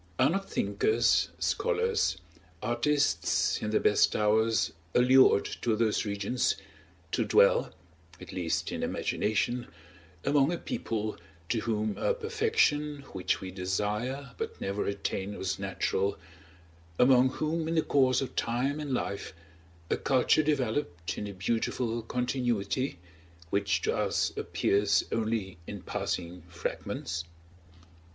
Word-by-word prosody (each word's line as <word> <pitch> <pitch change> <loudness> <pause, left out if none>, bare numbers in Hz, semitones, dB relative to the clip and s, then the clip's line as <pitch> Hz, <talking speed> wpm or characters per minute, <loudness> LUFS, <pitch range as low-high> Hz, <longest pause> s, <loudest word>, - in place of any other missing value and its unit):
Are 130 +3 +4
not 195 +2 -2
thinkers, 100 +3 +2
scholars, 465 -2 +1 0.5
artists, 120 -7 +1
in 110 - -2
their 110 - +2
best 105 - +3
hours 110 +1 +2 0.2
allured 125 -3 +6 0.2
to 115 -2 +1
those 110 -1 +1
regions, 100 +4 0 0.6
to - - +1
dwell - - +4 0.5
(at - - -10
least 85 -3 -1
in - - -3
imagination) 120 +3 -1 0.6
among 140 +1 +3
a 175 - -1
people 110 - -3 0.3
to 115 - +1
whom 110 -1 -1
a 485 - +1
perfection 435 - +1
which 95 -2 -1
we 95 - -6
desire 105 +8 -2
but - - -4
never 100 +1 -2
attain 100 0 -3
was 95 0 -2
natural, 100 0 -1 0.8
among 130 0 +6
whom 155 +4 -2
in 165 - -1
the 160 - +3
course 130 -2 +3
of 135 - -5
time 130 +5 0
and 145 -4 -2
life, 100 -4 -3 0.6
a - - +2
culture 130 +3 +3
developed 125 - -1
in 105 - -4
a - - -5
beautiful 115 +4 -1
continuity, 125 -1 -1 0.5
which 100 -4 +1
to - - +1
us - - 0
appears 100 -1 +2
only 110 -6 -2
in 100 -3 -7
passing 90 0 -3
fragments? 85 -1 -4
115 Hz, 125 wpm, -29 LUFS, 100-135 Hz, 0.8 s, allured